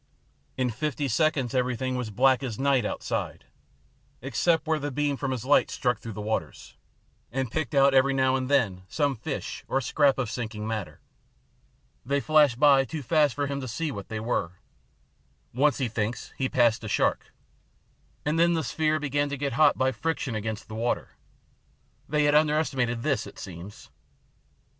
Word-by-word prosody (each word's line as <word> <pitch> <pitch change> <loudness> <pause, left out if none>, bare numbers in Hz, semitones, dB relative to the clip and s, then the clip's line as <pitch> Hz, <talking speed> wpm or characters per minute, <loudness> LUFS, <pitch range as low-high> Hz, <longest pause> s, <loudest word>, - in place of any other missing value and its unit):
In 130 -2 0
fifty 145 +3 -2
seconds 135 -1 +1
everything 130 0 -1
was 125 -2 -2
as - - -8
black 130 +2 +4
as 120 -6 -4
night 135 -4 +2
outside, - - -3 0.7
except 135 +7 +1
where 160 -1 +1
the 145 0 -3
beam 145 +1 0
from 135 0 -3
his 130 -2 -3
light 145 +2 +4
struck 125 -3 -1
through 115 - -7
the 105 - -6
waters, 110 +1 -4 0.6
and 130 -1 -2
picked 150 -4 -2
out 140 0 +5
every 135 +1 +4
now 130 -1 +2
and 130 0 -2
then 110 -10 +2
some 145 +1 0
fish 135 +5 -5
or 135 - +1
scrap 140 +1 +2
of 125 -5 -2
sinking 110 -3 -5
matter. 110 -4 -5 1.0
They 140 +3 0
flashed 150 -5 +3
by 140 -2 +6
too 150 +2 -6
fast 150 +1 +2
for 145 - -1
him 140 0 -3
to 130 - -5
see 150 +7 -3
what 100 -5 -8
they 110 -1 -4
were. 110 -6 -2 1.0
Once 140 +2 +2
he 130 - 0
thinks 110 +1 -3
he 130 -1 -1
passed 120 -2 +2
a - - -5
shark. - - 0 0.9
And 155 +2 +1
then 170 0 +4
the 160 - -1
sphere 155 +3 0
began 145 0 -1
to 140 - -4
get 140 -1 -2
hot 150 +3 +4
by 130 0 +2
friction 145 -3 -2
against 110 +1 -4
the 110 - -9
water. 115 +2 -1 1.0
They 150 +1 +2
had 145 0 +3
underestimated 150 -6 +1
this, 145 -4 0
it - - -13
seems. 95 +2 -10
135 Hz, 175 wpm, -27 LUFS, 115-145 Hz, 1.0 s, by